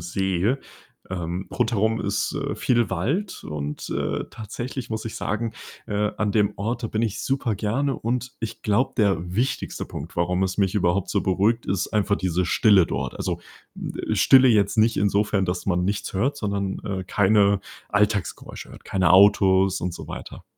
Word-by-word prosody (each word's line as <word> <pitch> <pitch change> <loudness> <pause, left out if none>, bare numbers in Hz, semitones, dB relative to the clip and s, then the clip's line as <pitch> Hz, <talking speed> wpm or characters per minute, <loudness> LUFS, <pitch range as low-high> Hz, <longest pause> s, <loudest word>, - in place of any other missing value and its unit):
See. 95 +6 0 0.5
Ähm, 90 0 -4
rundherum 110 -2 +1
ist, 105 +2 -1
äh, 140 0 -2
viel 120 -3 +1
Wald 155 - -2
und, 75 -1 -5
äh, - - -2
tatsächlich 120 +4 -6
muss 110 -1 -3
ich 115 - -5
sagen, 110 +2 -2 0.3
äh, 105 0 0
an 105 -1 0
dem 105 -1 +2
Ort, 115 +4 -3
da - - +1
bin 110 0 -2
ich 110 -3 -1
super 130 -6 0
gerne, 130 +7 0
und, 125 +2 -2
ich 115 -1 -6
glaube, 105 +5 +1
der 100 -5 +3 0.2
wichtigste 125 +5 -2
Punkt, 75 - -8
warum 90 +2 +1
es 95 -1 -2
mich 100 0 +1
überhaupt 90 0 +1
so 100 - +1
beruhigt, 100 +6 +1
ist 95 0 -1
einfach 105 -1 +1
diese 90 -1 0
Stille 100 -1 +5
dort. - - -3
Also, - - -3 0.3
hm, - - -6 0.2
Stille 130 -1 +6
jetzt 105 -3 +3
nicht 110 +1 +4
insofern, 100 0 +2
dass 90 0 -3
man 90 -2 +1
nichts 100 +2 -2
hört, 130 +10 0
sondern, 100 -5 -2
äh, 95 -2 -3
keine 100 +1 +3 0.3
Alltagsgeräusche 105 -2 -1
hört, - - -14
keine 90 -3 +2
Autos 95 -1 +5
und 90 0 -2
so - - -8
weiter. - - -8
100 Hz, 170 wpm, -24 LUFS, 95-115 Hz, 0.5 s, Stille